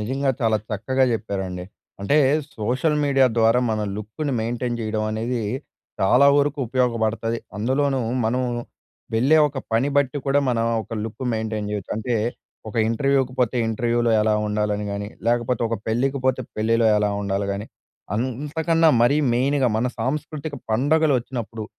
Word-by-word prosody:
నిజంగా 135 Hz, +5 st, 0 dB
చాలా 110 Hz, -2 st, +3 dB
చక్కగా 130 Hz, +6 st, +1 dB
చెప్పారండి. 95 Hz, -4 st, -3 dB, 0.4 s
అంటే 100 Hz, +9 st, +2 dB, 0.4 s
సోషల్ 130 Hz, +8 st, 0 dB
మీడియా 135 Hz, -2 st, +4 dB
ద్వారా 115 Hz, +2 st, +4 dB
మన 110 Hz, -1 st, -1 dB, 0.2 s
లుక్‌ని 110 Hz, +8 st, -4 dB
మెయింటైన్ 120 Hz, +1 st, -2 dB
చేయడం 110 Hz, -1 st, -2 dB
అనేది 115 Hz, +3 st, -2 dB, 0.6 s
చాలా 125 Hz, +8 st, +5 dB
వరకు 145 Hz, 0 st, +1 dB
ఉపయోగపడతది. 115 Hz, -2 st, 0 dB, 0.2 s
అందులోనూ 135 Hz, +5 st, +1 dB, 0.3 s
మనం 125 Hz, +3 st, 0 dB, 0.7 s
వెళ్ళే 135 Hz, +8 st, +4 dB
ఒక 135 Hz, -, -6 dB
పని 115 Hz, +5 st, +2 dB
బట్టి 140 Hz, 0 st, +2 dB
కూడా 140 Hz, +1 st, +3 dB
మనం 115 Hz, -2 st, +1 dB, 0.2 s
ఒక 115 Hz, -, -7 dB
లుక్ 115 Hz, +4 st, -7 dB
మెయింటైన్ 110 Hz, -2 st, -2 dB
చేయొచ్చు. 105 Hz, -3 st, -4 dB
అంటే, 120 Hz, +2 st, -2 dB, 0.5 s
ఒక 105 Hz, -, -9 dB
ఇంటర్‌వ్యూ‌కి 135 Hz, +2 st, +1 dB
పోతే 125 Hz, 0 st, +1 dB
ఇంటర్‌వ్యూలో 120 Hz, +1 st, +1 dB
ఎలా 105 Hz, 0 st, +2 dB
ఉండాలని 105 Hz, 0 st, -1 dB
గానీ, 100 Hz, 0 st, -4 dB, 0.2 s
లేకపోతే 120 Hz, +1 st, +1 dB
ఒక 115 Hz, -, -1 dB
పెళ్ళికి 130 Hz, +5 st, 0 dB
పోతే 130 Hz, 0 st, +2 dB, 0.2 s
పెళ్ళిలో 115 Hz, +1 st, +2 dB
ఎలా 105 Hz, 0 st, +1 dB
ఉండాలి 100 Hz, 0 st, -1 dB
గానీ, 100 Hz, +2 st, -5 dB, 0.5 s
అంతకన్నా 150 Hz, +7 st, +1 dB
మరీ 120 Hz, +5 st, +4 dB, 0.2 s
మెయిన్‌గా 130 Hz, +2 st, +2 dB
మన 115 Hz, +3 st, +1 dB
సాంస్కృతిక 150 Hz, +4 st, -3 dB, 0.2 s
పండుగలు 145 Hz, +6 st, +3 dB
ఒచ్చినప్పుడు 115 Hz, -3 st, -6 dB
120 Hz, 140 wpm, -23 LUFS, 110-135 Hz, 0.7 s, చాలా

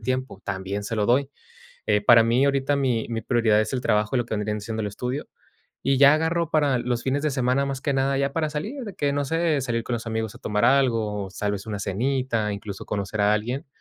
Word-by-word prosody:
tiempo, 130 Hz, -3 st, -3 dB
también 100 Hz, +1 st, -3 dB
se 115 Hz, -, -3 dB
lo 105 Hz, -, +1 dB
doy. 135 Hz, +3 st, +2 dB, 0.6 s
Eh, 105 Hz, -1 st, +3 dB
para 115 Hz, +2 st, +7 dB
mí, 120 Hz, +4 st, +3 dB
ahorita 140 Hz, 0 st, +1 dB
mi 125 Hz, -5 st, 0 dB
mi 115 Hz, -1 st, -2 dB
prioridad 115 Hz, -3 st, +2 dB
es 110 Hz, -, -2 dB
el 130 Hz, -, -1 dB
trabajo 105 Hz, +1 st, +1 dB
y -, -, +3 dB
lo 120 Hz, -, 0 dB
que 110 Hz, -, -3 dB
vendrían 105 Hz, 0 st, -2 dB
siendo 110 Hz, +1 st, -4 dB
el 105 Hz, -, -2 dB
estudio. 125 Hz, +7 st, -4 dB, 0.6 s
Y 135 Hz, -1 st, +2 dB
ya 140 Hz, +1 st, +8 dB
agarro 165 Hz, +1 st, 0 dB
para 145 Hz, -5 st, +2 dB
los 120 Hz, 0 st, -2 dB
fines 135 Hz, +2 st, 0 dB
de 155 Hz, -, +1 dB
semana, 130 Hz, +1 st, +1 dB
más 135 Hz, -1 st, -3 dB
que 140 Hz, -, -1 dB
nada, 135 Hz, 0 st, +1 dB
ya 140 Hz, 0 st, 0 dB
para 155 Hz, -1 st, -1 dB
salir. 210 Hz, -, -4 dB
De 205 Hz, -, -7 dB
que 140 Hz, -1 st, 0 dB
no 145 Hz, 0 st, 0 dB
sé, 165 Hz, 0 st, +1 dB
salir 115 Hz, -3 st, -2 dB
con 120 Hz, -, -2 dB
los 115 Hz, 0 st, -5 dB
amigos 110 Hz, 0 st, -3 dB
a -, -, -12 dB
tomar 105 Hz, 0 st, -1 dB
algo, 115 Hz, -6 st, +2 dB
o -, -, -9 dB
tal 105 Hz, +1 st, -2 dB
vez 100 Hz, +1 st, -5 dB
una 105 Hz, -2 st, -4 dB
cenita, 115 Hz, +1 st, -1 dB
incluso 100 Hz, -1 st, -7 dB
conocer 105 Hz, 0 st, -3 dB
a 105 Hz, +1 st, +4 dB
alguien, 120 Hz, +7 st, -2 dB
120 Hz, 245 wpm, -24 LUFS, 105-140 Hz, 0.6 s, ya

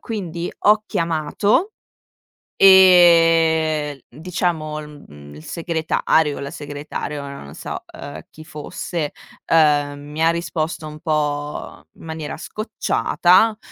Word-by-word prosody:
quindi 175 Hz, -7 st, -5 dB
ho 210 Hz, +1 st, +5 dB
chiamato 170 Hz, -, 0 dB, 0.9 s
e, 165 Hz, -6 st, +5 dB
diciamo, 160 Hz, 0 st, -3 dB
mhmm, 75 Hz, -, -13 dB
il 75 Hz, +1 st, -12 dB
segretario 160 Hz, -, 0 dB
o -, -, -7 dB
la 140 Hz, +1 st, -6 dB
segretaria, 145 Hz, 0 st, -6 dB
ora 140 Hz, 0 st, -8 dB
non 70 Hz, +2 st, -12 dB
so, -, -, -6 dB
ehm, 145 Hz, -, -9 dB
chi 155 Hz, -, -13 dB
fosse, 150 Hz, +1 st, -5 dB, 0.3 s
ehm, 145 Hz, -3 st, +2 dB
mi 150 Hz, +2 st, -5 dB
ha 165 Hz, -, +5 dB
risposto 165 Hz, -1 st, -3 dB
un 155 Hz, 0 st, -9 dB
po' 150 Hz, -2 st, -3 dB
in -, -, -17 dB
maniera 160 Hz, -2 st, -6 dB
scocciata, 215 Hz, +1 st, +1 dB
155 Hz, 115 wpm, -20 LUFS, 145-170 Hz, 0.9 s, ho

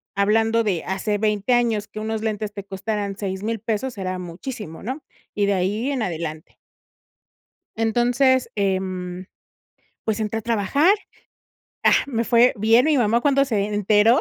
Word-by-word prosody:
hablando 225 Hz, +3 st, +2 dB
de 190 Hz, -6 st, -1 dB
hace 200 Hz, +2 st, -1 dB
20 215 Hz, +2 st, +1 dB
años 225 Hz, -4 st, +1 dB
que 215 Hz, -, -8 dB
unos 220 Hz, 0 st, -3 dB
lentes 215 Hz, -1 st, -2 dB
te 200 Hz, -, -6 dB
costaran 200 Hz, +1 st, -3 dB
6000 205 Hz, +3 st, -3 dB
pesos 225 Hz, +3 st, -3 dB
era 185 Hz, -1 st, -3 dB
muchísimo, 180 Hz, 0 st, -7 dB
¿no? 265 Hz, +7 st, -5 dB, 0.3 s
Y 205 Hz, -1 st, +2 dB
de 200 Hz, -, +2 dB
ahí 205 Hz, +8 st, 0 dB
en 265 Hz, -4 st, -2 dB
adelante. 160 Hz, -3 st, -5 dB, 1.2 s
Entonces, 245 Hz, +3 st, +2 dB
em, 185 Hz, -2 st, -2 dB, 0.8 s
pues, 220 Hz, 0 st, -1 dB
entré 215 Hz, +1 st, -1 dB
a 225 Hz, -, -6 dB
trabajar. 235 Hz, -, +3 dB, 0.9 s
Ah, -, -, +6 dB
me 230 Hz, -4 st, -1 dB
fue 240 Hz, +1 st, +4 dB
bien 225 Hz, +7 st, +4 dB
y -, -, +4 dB
mi -, -, +3 dB
mamá 235 Hz, 0 st, +2 dB
cuando 275 Hz, -1 st, +3 dB
se 220 Hz, -6 st, 0 dB
enteró, 210 Hz, +4 st, +4 dB
215 Hz, 150 wpm, -22 LUFS, 195-235 Hz, 1.2 s, Ah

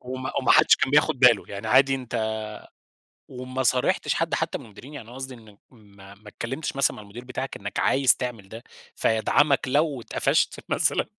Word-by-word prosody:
وما 130 Hz, +1 st, -6 dB
وما -, -, 0 dB
حدش -, -, +6 dB
كان -, -, 0 dB
بياخد 150 Hz, -1 st, +3 dB
باله، 125 Hz, -5 st, +5 dB
يعني 100 Hz, +2 st, -7 dB
عادي 135 Hz, +3 st, +4 dB
أنت 115 Hz, -4 st, -3 dB, 0.9 s
وما 130 Hz, +1 st, -5 dB
صارحتش 125 Hz, 0 st, +1 dB
حد -, -, -2 dB
حتى -, -, -1 dB
من -, -, -13 dB
المديرين، 120 Hz, +7 st, -13 dB
يعني 130 Hz, -6 st, -9 dB
أنا 120 Hz, -, -12 dB
قصدي 130 Hz, 0 st, -7 dB
إنك 110 Hz, -3 st, -18 dB
ما 100 Hz, -4 st, -17 dB
ما 105 Hz, +1 st, -19 dB
اتكلّمتش 130 Hz, +9 st, -5 dB
مثلًا 135 Hz, -1 st, +1 dB
مع 105 Hz, -, -10 dB
المدير 110 Hz, +5 st, -11 dB
بتاعك 130 Hz, +1 st, -5 dB
إنك 100 Hz, 0 st, -5 dB
عايز 135 Hz, -1 st, +3 dB
تعمل 115 Hz, -6 st, -6 dB
ده، 115 Hz, +1 st, -10 dB, 0.3 s
فيدعمك 130 Hz, +5 st, +2 dB
لو 145 Hz, -1 st, 0 dB
اتقفشت -, -, 0 dB
مثلًا؟ -, -, +1 dB
125 Hz, 180 wpm, -24 LUFS, 110-135 Hz, 0.9 s, حدش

